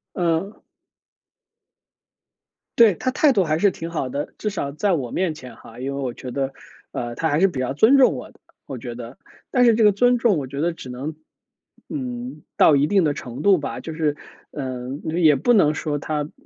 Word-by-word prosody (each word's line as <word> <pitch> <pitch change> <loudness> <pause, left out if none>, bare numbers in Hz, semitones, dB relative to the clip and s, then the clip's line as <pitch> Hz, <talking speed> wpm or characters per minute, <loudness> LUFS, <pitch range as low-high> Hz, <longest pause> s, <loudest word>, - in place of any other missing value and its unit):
嗯。 175 +3 0 2.2
对， 225 -4 +7
他 255 - -2
态 295 +1 +4
度 195 -6 +2
还 155 -1 0
是 200 +3 +4
挺 165 -2 -7
好 155 -6 -2
的， 140 +3 -5
至 210 - -3
少 145 -8 -4
在 195 +7 0
我 135 -8 -1
面 185 -3 0
前 130 -4 -11
哈。 115 - -14
因 135 +2 -4
为 140 - -3
我 125 -2 -2
觉 125 - -8
得， 135 0 -2 0.4
呃， 120 0 -4
他 160 - -1
还 150 0 +1
是 190 - +5
比 155 -9 -4
较 130 +1 -1
尊 220 - +5
重 260 - +5
我 125 - -8
的， - - -27 0.3
我 135 -3 -6
觉 120 0 -7
得。 120 +1 -9 0.4
但 250 -1 +4
是 235 -2 +6
这 225 - +3
个 210 - +6
尊 245 +4 +3
重 225 -7 +2
我 135 -3 -4
觉 140 +2 -5
得 170 +3 +1
只 130 -6 -10
能， 135 +6 -5 0.7
嗯， 250 - -6
到 150 - +6
一 140 +2 +3
定 195 -3 +3
的 150 -2 +1
程 125 +2 -7
度 195 0 +5
吧。 145 - -5
就 160 - -7
是， 155 -2 0 0.3
呃， 130 -3 -5 0.2
就 160 - -2
也 155 -4 +5
不 190 - +2
能 155 -9 +4
说 145 -1 -2
他 150 0 -2
嗯 145 - -9
155 Hz, 235 characters per minute, -22 LUFS, 135-200 Hz, 2.2 s, 对